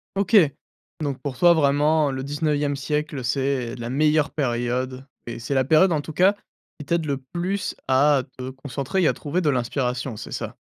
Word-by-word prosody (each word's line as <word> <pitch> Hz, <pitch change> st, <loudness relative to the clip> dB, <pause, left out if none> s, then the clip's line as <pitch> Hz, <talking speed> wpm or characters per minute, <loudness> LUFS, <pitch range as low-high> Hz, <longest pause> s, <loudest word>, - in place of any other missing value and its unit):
OK. 200 Hz, +3 st, +1 dB, 0.7 s
Donc 140 Hz, -2 st, -2 dB
pour 130 Hz, -2 st, -5 dB
toi, 175 Hz, -1 st, +6 dB
vraiment 150 Hz, 0 st, +3 dB
le 130 Hz, 0 st, -4 dB
19e 145 Hz, 0 st, -1 dB
siècle, 150 Hz, 0 st, -3 dB
c'est 130 Hz, -2 st, -1 dB
la 120 Hz, -1 st, -6 dB
meilleure 150 Hz, +2 st, +2 dB
période. 125 Hz, -1 st, -2 dB, 0.2 s
Et 120 Hz, -, -5 dB
c'est 120 Hz, +4 st, -3 dB
la 130 Hz, -, +3 dB
période, 160 Hz, +7 st, +4 dB
en 155 Hz, -3 st, +1 dB
tout 160 Hz, -, -8 dB
cas, 185 Hz, +5 st, +4 dB, 0.5 s
qui 150 Hz, -, -8 dB
t'aide, 170 Hz, +2 st, 0 dB
le 140 Hz, -2 st, -1 dB
plus, 175 Hz, +9 st, -3 dB
à 135 Hz, 0 st, +4 dB
te 130 Hz, 0 st, -5 dB
concentrer 135 Hz, +6 st, -3 dB
et -, -, +4 dB
à -, -, +3 dB
trouver 160 Hz, +4 st, -2 dB
de 155 Hz, -, +2 dB
l'inspiration, 125 Hz, -2 st, -2 dB
c'est -, -, -8 dB
ça? -, -, -5 dB
140 Hz, 185 wpm, -23 LUFS, 130-155 Hz, 0.7 s, toi